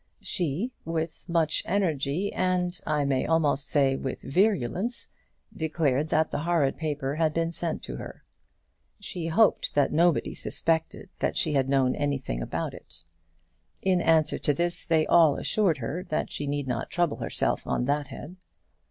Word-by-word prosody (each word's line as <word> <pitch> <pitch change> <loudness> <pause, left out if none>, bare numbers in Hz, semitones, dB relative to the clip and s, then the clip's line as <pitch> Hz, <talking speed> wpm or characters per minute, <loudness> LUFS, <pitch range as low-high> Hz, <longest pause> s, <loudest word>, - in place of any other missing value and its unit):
She, 180 - -1
with 165 +1 -4
much 165 -2 +1
energy 170 -1 0
and, 180 -1 0
I 150 -2 +1
may 135 -2 0
almost 150 -3 +2
say, 135 -2 +2
with 135 - -5
virulence, 195 - 0 0.5
declared 155 -2 0
that 160 +1 +2
the - - -2
horrid 160 -4 +1
paper 145 -3 -3
had 160 -1 +1
been 165 0 0
sent 170 -1 -3
to - - -6
her. - - -9 0.8
She 180 -4 -5
hoped 210 +6 +2
that 145 -2 +3
nobody 170 +2 +2
suspected 160 -1 -1
that - - -1
she - - 0
had 135 -2 +1
known 135 -2 +3
anything 140 - -2
about - - -3
it. - - -13 0.8
In 185 -2 +2
answer 160 -2 +3
to 145 - +1
this, 175 +3 +2
they 160 -2 +3
all 160 -4 +5
assured 195 -8 +1
her 140 +8 -4
that 155 - -2
she 145 - -3
need 145 0 -2
not 125 - -2
trouble 175 -3 0
herself - - -1
on 125 - 0
that 145 +1 0
head. 145 +6 -9
160 Hz, 160 wpm, -27 LUFS, 140-175 Hz, 0.8 s, all